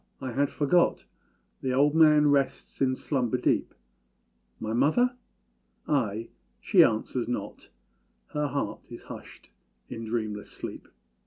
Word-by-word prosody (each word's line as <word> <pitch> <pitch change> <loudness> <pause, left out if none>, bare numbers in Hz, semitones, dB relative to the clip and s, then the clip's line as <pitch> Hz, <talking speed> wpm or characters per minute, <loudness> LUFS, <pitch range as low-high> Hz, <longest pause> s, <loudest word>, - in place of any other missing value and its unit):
I 130 -2 -4
had 140 +3 +1
forgot 170 +4 +2 0.6
The 130 -1 -1
old 145 +3 +3
man 150 -2 +6
rests 140 -1 -1
in 130 -1 +3
slumber 130 -4 -1
deep: - - +1 0.9
My 110 0 -3
mother? 245 - +3 0.7
Ay! 115 -6 0 0.3
she - - +5
answers 115 +2 0
not 105 -4 -5 0.6
Her 150 0 -1
heart 140 0 -4
is - - -9
hushed - - -11 0.4
in 115 - -6
dreamless 110 -2 -3
sleep. - - -8
135 Hz, 120 wpm, -27 LUFS, 115-150 Hz, 0.9 s, man